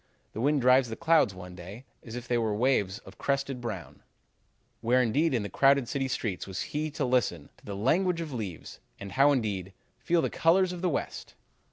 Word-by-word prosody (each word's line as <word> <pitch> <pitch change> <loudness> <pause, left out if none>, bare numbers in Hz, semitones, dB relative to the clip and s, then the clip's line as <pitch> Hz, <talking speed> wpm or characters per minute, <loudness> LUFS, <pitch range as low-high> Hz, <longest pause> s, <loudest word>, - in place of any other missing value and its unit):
The 110 - -4
wind 145 +1 +2
drives 125 0 +5
the 110 - -4
clouds 165 - +3
one 90 0 -9
day 95 +8 -10 0.2
as 115 -1 -8
if 120 0 -7
they 120 -1 +1
were 110 -2 0
waves 105 -5 +1
of - - -14
crested 140 -2 -1
brown.' 110 -8 -6 0.8
Where 125 +3 +3
indeed 135 +7 +2
in 120 -5 0
the - - -3
crowded 135 +5 +3
city 135 +1 -1
streets 110 -8 -3
was 95 0 -5
he 155 +1 -1
to 145 - -1
listen 120 - 0
'to - - -22
the 100 - -5
language 170 - +1
of 165 -3 -5
the - - -5
leaves,' 95 -7 -7 0.2
and 100 -1 -7
how 140 +2 +5
indeed, 100 -8 -1 0.3
'Feel 165 +6 +1
the - - -1
colors 180 +2 +3
of 175 - -7
the 185 - +1
West.' 155 - -4
125 Hz, 210 wpm, -28 LUFS, 105-140 Hz, 0.8 s, drives